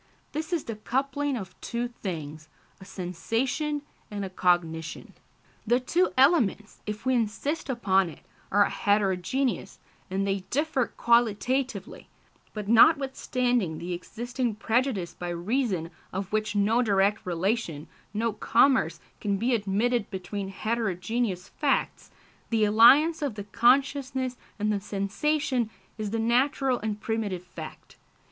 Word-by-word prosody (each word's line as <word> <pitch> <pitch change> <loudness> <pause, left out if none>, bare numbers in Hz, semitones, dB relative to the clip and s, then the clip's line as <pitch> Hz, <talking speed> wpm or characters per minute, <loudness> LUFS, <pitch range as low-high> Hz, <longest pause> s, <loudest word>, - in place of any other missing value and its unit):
This 315 +2 -4
is 340 -4 0
the 225 -2 -6
coupling 275 +4 -1
of 190 -4 -7
two 240 +1 -2
things 155 -9 -6 0.3
a 190 - -12
sensation 230 - -2 0.3
and 205 -1 -4
a 190 - -7
cognition. 165 -3 0 0.5
The 240 +3 +4
two 345 +8 +1
elements, 255 - +3
if 210 +2 -5
we 260 - +3
insist 250 +7 -1
upon 195 -7 +2
it, 155 - -12 0.3
are 205 +1 +5
heterogeneous, 205 +6 0 0.3
and 195 +1 -1
they 195 0 0
differ 280 -3 +1
qualitatively; 235 - +1 0.4
but 210 -2 -6
notwithstanding 245 - +3
the 175 +2 -4
existing 240 +5 -3
prejudice 225 -4 0
by 175 - -6
reason 180 -1 -1 0.2
of 195 +2 -4
which 215 -1 0
no 215 +4 +3
direct 200 -2 +2
relation, 180 -3 -1 0.2
no 220 +2 -1
commerce, 260 +5 +3 0.2
can 200 -2 0
be 240 +5 +1
admitted 220 +2 +1
between 195 +1 -5
heterogeneous 200 -1 -2
facts, - - -1 0.4
the 225 -2 +3
alliance 270 +10 +6
of 280 -7 -2
the 205 - -5
consciousness 260 +3 +2 0.2
and 210 0 0
the 205 - 0
sensation 230 +5 -1 0.3
is 215 -1 -2
the 225 - -2
natural 255 +3 +2
and 210 -1 -3
primitive 215 -6 -2
fact. 165 -3 -10
220 Hz, 125 wpm, -27 LUFS, 195-255 Hz, 0.5 s, alliance